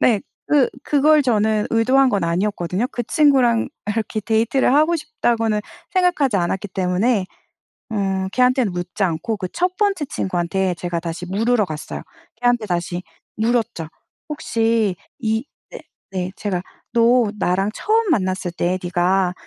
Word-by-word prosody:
네. 220 -5 +3 0.3
그 290 -3 +3
그걸 300 +1 +4
저는 220 -3 +1
의도한 255 +4 +4
건 200 -6 0
아니었거든요. 185 +4 -1
그 240 - -3
친구랑 260 -5 +3 0.2
이렇게 215 0 -2
데이트를 230 +5 +2
하고 315 +3 +4
싶다고는 230 -8 0 0.3
생각하지 350 - +2
않았기 190 +3 -1
때문에 185 +3 +1 0.7
응 190 -2 -1
걔한테는 250 -4 +2
묻지 175 +3 -3
않고 185 +6 -1
그 185 - -4
1 360 +1 0
번째 395 -8 +1
친구한테 185 -2 -1
제가 175 0 -3
다시 170 +1 -5
물으러 220 +3 +1
갔어요. 155 -2 -6 0.4
걔한테 245 -2 +2
다시 175 -1 -2 0.3
물었죠. 225 -7 0 0.4
혹시 225 -8 0 0.2
이 220 +2 -1 0.3
네. - - -8 0.3
네. 185 -1 -3
제가 185 -4 -3 0.3
"너 235 -1 +4
나랑 195 +3 +1
처음 440 -1 +1
만났을 185 - 0
때 175 +2 -1
네가 180 +1 +1
215 Hz, 295 characters per minute, -21 LUFS, 185-250 Hz, 0.7 s, 그걸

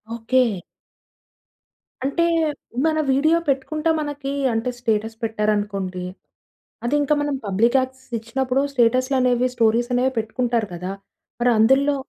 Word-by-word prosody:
Okay. 235 -4 +1 1.4
అంటే, 335 +5 +1 0.6
మన 315 -1 +2
video 310 +5 +3
పెట్టుకుంటే 305 +4 0
మనకి 290 -2 -4 0.2
అంటే 225 +3 -1
స్టేటస్ 225 -2 -1
పెట్టారనుకోండి. 205 -4 -1 0.8
అది 255 +5 0
ఇంకా 290 +1 +2
మనం 290 -1 -1
పబ్లిక్ 225 +6 +2
యాక్సెస్ 260 -1 -6
ఇచ్చినప్పుడు 255 +3 -1
స్టేటస్‌లనేవి 255 0 +2
స్టోరీస్ 235 +1 +2
అనేవి 260 +1 +1
పెట్టుకుంటారు 230 -1 -1
కదా! 180 +2 -5 0.5
మరి 245 - +4
అందుల్లో 270 +6 +4
250 Hz, 110 wpm, -22 LUFS, 220-270 Hz, 1.4 s, మరి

